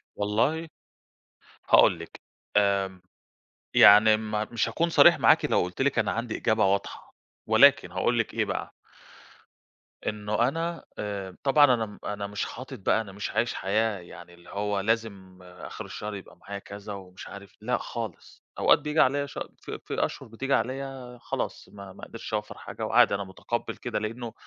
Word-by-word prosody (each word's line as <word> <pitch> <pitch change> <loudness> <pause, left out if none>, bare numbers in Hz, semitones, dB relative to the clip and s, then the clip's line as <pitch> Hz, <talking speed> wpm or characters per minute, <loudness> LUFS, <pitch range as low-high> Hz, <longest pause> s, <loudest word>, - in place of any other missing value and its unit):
والله 115 +11 0 1.0
هاقول 85 - +6
لِك 85 - -11 0.4
آمم، 100 -2 +1 0.7
يعني 110 +1 +8
ما 110 -1 -2
مش 115 -1 0
هاكون 165 +9 0
صريح - - +6
معاكِ - - +5
لو - - +2
قُلت 90 +7 -4
لِك 140 +1 +2
أنا - - +1
عندي 115 -1 -3
إجابة 110 -1 +2
واضحة 100 +1 -2 0.3
ولكن - - +5
هاقول - - +1
لِك - - -1
إيه - - 0
بقى - - -4 1.4
إنه 105 +2 0
أنا 165 +4 -3
آآ 100 -3 -5
طبعًا 145 -1 +5
أنا 115 -2 0
م 105 -1 -13
أنا 100 0 -3
مش 100 0 -3
حاطط 130 +1 -8
بقى 105 +3 +2
أنا 105 -3 -9
مش 100 +1 -5
عايش 120 +2 0
حياة 105 +1 0
يعني 85 0 -13
اللي 85 0 -17
هو 105 0 -2
لازم 100 -3 -2
آخر 90 0 -9
الشهر 105 0 -6
يبقى 100 - -11
معايا 100 0 -7
كذا 100 +1 -9
ومش 95 -2 -10
عارف 100 0 -11
لأ، 125 +3 0
خالص 115 -2 -7 0.2
أوقات - - +5
بييجي 150 +1 -2
عليّا 140 +2 +3
ش 140 - -11 0.2
ف - - -9
في - - -2
أشهُر - - -7
بتيجي 135 +5 -3
عليّا 130 0 -3
خلاص - - -4
ما 100 -2 -11
ما - - -15
قدرتش 115 -1 -9
أوفّر 105 0 -3
حاجة - - -6
وعادي - - +4
أنا 100 - -3
مُتقبل 100 +5 -4
كده 120 -3 -3
لإنه 115 +2 -5
105 Hz, 170 wpm, -27 LUFS, 100-120 Hz, 1.4 s, يعني